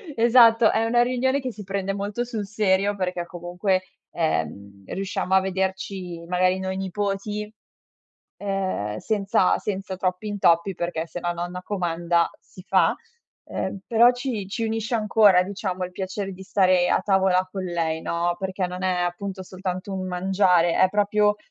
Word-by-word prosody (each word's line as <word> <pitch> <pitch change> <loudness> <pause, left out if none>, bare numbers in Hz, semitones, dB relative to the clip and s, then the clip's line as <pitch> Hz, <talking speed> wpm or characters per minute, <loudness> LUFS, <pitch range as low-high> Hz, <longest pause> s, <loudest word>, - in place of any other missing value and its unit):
esatto, 230 -1 +6
è 225 +1 +1
una 240 +1 +3
riunione 260 +2 +1
che 260 -1 -4
si 215 -2 -9
prende 195 0 -2
molto 200 +4 -3
sul 225 -4 -4
serio, 200 -1 +1
perché 180 -2 -2
comunque, 180 +2 -1 0.3
ehm, 100 - -2
riusciamo 190 - -3
a 190 - +6
vederci 190 -2 -3
magari 185 +1 +2
noi 190 0 -3
nipoti, 205 +2 -3 0.9
uhm, 190 - -2
senza 200 -3 +1
senza 195 -2 -4
troppi 185 +2 -2
intoppi 190 -2 +2
perché 170 -1 -3
se 175 +2 -7
la 175 0 -1
nonna 175 +1 -5
comanda, 170 -3 0
si 185 - -15
fa. - - +3 0.5
Ehm, 195 - -4
però 235 +1 +6
ci 245 -5 -4
ci 225 +3 -3
unisce 225 +1 -2
ancora, 210 -4 +5
diciamo, 185 -1 -3
il 180 - -7
piacere 195 +1 -4
di 190 +1 -10
stare 185 -2 +3
a - - +3
tavola 190 -2 +2
con 190 0 -4
lei, 165 -2 -1
no, 175 +1 -1
perché 190 -1 -2
non 180 +1 -6
è 185 -1 +1
appunto 190 +2 -4
soltanto 185 +1 -5
un 185 -1 -3
mangiare, 180 -2 +2
è 185 - +4
proprio 210 +1 +2
190 Hz, 155 wpm, -24 LUFS, 180-205 Hz, 0.9 s, esatto